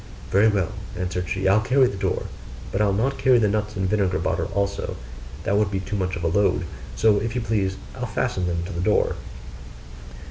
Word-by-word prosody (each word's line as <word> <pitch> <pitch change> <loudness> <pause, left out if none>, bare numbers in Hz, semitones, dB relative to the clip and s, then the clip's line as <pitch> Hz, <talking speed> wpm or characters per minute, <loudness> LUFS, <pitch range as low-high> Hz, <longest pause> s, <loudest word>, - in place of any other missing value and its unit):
'Very 100 +3 +5
well,' 100 -7 +1 0.3
answered 90 -1 -2
she, 95 0 0
'I'll 100 +3 +5
carry 130 +4 +4
the 120 - -1
door; 95 -1 -1 0.5
but 95 - 0
I'll 105 -1 +3
not 125 +8 0
carry 130 -2 +5
the 110 -3 +3
nuts 105 +1 -1
and 95 -1 0
vinegar 95 -2 +1
bottle - - -1
also 100 0 -1 0.5
that 100 - +1
would 105 -1 +3
be 95 -1 -2
too 95 +2 -4
much 95 -2 -1
of 85 - -5
a - - +2
load; 100 +5 +2 0.3
so 105 - +4
if 115 +2 -3
you 125 - 0
please, 100 -4 0 0.2
I'll - - -4
fasten 90 -1 -1
them 85 -1 -1
to 100 - -6
the 85 - -3
door. 105 +3 +2
100 Hz, 210 wpm, -24 LUFS, 95-105 Hz, 0.5 s, Very